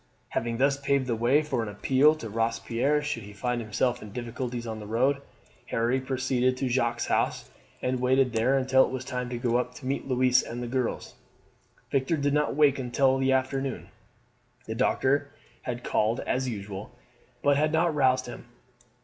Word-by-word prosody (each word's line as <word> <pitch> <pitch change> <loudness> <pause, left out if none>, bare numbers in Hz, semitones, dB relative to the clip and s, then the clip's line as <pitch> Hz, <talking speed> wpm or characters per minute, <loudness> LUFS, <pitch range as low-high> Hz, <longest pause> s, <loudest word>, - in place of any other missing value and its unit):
Having 115 0 -2
thus 140 +2 +3
paved 140 -1 +1
the 120 -2 -1
way 125 +7 +3
for 150 -6 -1
an 110 - -3
appeal 135 +8 +3
to 135 -7 -7
Robespierre 115 +6 0
should 145 -5 -3
he 105 0 -11
find 125 +3 -2
himself 115 +3 -1
in 105 - -9
difficulties 120 +1 -4
on 110 -1 -5
the 105 - -8
road, 130 +6 +1 0.5
Harry 120 +3 0
proceeded 130 -1 0
to 135 - -1
Jacques' 120 -1 0
house - - -1 0.3
and 125 0 0
waited 130 0 +2
there 120 +4 +2
until 130 0 +4
it - - -1
was 130 -1 -4
time 125 0 -3
to 125 - -3
go 120 0 +1
up 125 - -2
to 140 - -10
meet 135 +1 -2
Louise 130 0 +3
and 120 +1 -6
the - - -4
girls. 125 0 -2 0.8
Victor 135 +4 +1
did 145 -1 0
not 150 -1 +1
wake 145 -2 +4
until 130 +1 +2
the 135 0 +2
afternoon. 130 - -1 0.8
The 110 - -4
doctor 135 +4 +1 0.3
had 120 -1 -5
called 110 +2 +1
as 130 0 -1
usual, 100 -1 -6 0.5
but 145 0 +4
had 155 +1 +2
not 160 +1 +2
roused 130 -3 +2
him. 120 - -9
130 Hz, 185 wpm, -27 LUFS, 120-135 Hz, 0.8 s, until